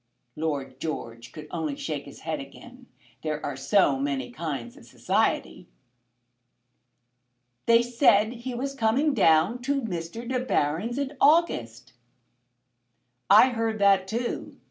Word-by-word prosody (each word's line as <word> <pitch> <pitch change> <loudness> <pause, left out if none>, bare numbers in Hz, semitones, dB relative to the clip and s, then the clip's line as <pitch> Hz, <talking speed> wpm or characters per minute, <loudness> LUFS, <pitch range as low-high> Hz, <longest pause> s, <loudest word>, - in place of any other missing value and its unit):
Lord 140 -4 -3
George 115 -7 -6
could 150 -1 -10
only 160 -4 -3
shake 145 -1 -5
his 140 - -13
head 160 -2 -3
again. 245 - -12 0.3
There 155 -1 -3
are 145 - -3
so 140 -1 +2
many 135 -2 -2
kinds 140 -8 -5
of - - -16
society! - - -1 2.0
"They 230 0 +6
said 235 -3 +3
he 245 +1 -6
was 275 +3 -3
coming 270 +4 +1
down 170 +4 +3
to 275 +1 -1
Mr. 185 +3 -5
De 255 0 -1
Baron's 200 - -1
in 280 0 -3
August." 120 - +2 1.4
"I 215 +6 +8
heard 225 -2 -2
that 195 -2 +3
too. 235 +4 -4
195 Hz, 125 wpm, -26 LUFS, 145-245 Hz, 2.0 s, I